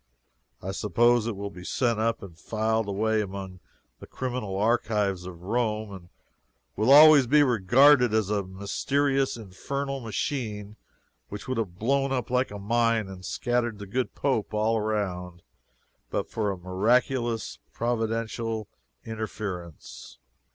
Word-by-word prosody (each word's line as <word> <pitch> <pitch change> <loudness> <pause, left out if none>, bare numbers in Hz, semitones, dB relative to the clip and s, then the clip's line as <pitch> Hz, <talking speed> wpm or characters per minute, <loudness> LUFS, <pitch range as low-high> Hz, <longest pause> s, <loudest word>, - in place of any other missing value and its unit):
I 95 - -3
suppose 115 +4 +2
it 115 - -2
will 100 +1 -5
be 90 -2 -11
sent 115 +3 0
up 115 0 0
and 90 -4 -10
filed 110 +5 -1
away 110 +2 +1
among 95 -2 -6 0.4
the - - -11
criminal 125 -7 -4
archives 105 -4 0
of 90 -1 -10
Rome, 110 0 -1
and 90 -2 -11 0.7
will 110 +4 +1
always 150 -2 +9
be 145 +4 +5
regarded 125 +2 +5
as 110 -2 +1
a 105 -1 +1
mysterious 135 +9 -1
infernal 135 +7 -4
machine 110 -3 -4 0.5
which 105 0 -8
would 130 -2 -1
have 90 -6 -4
blown 135 +5 +1
up 125 -2 -2
like 125 +1 +1
a 105 - -7
mine 115 +1 +1
and 95 -1 -10
scattered 120 0 -1
the 100 - -8
good 125 +6 -3
Pope 120 -7 -1
all 110 +2 +2
around, 95 -5 -3 0.7
but - - -2
for 110 -2 -1
a 95 - -3
miraculous 115 +6 0
providential 115 -1 -2 0.4
interference. 100 - -7
110 Hz, 135 wpm, -26 LUFS, 100-120 Hz, 0.7 s, always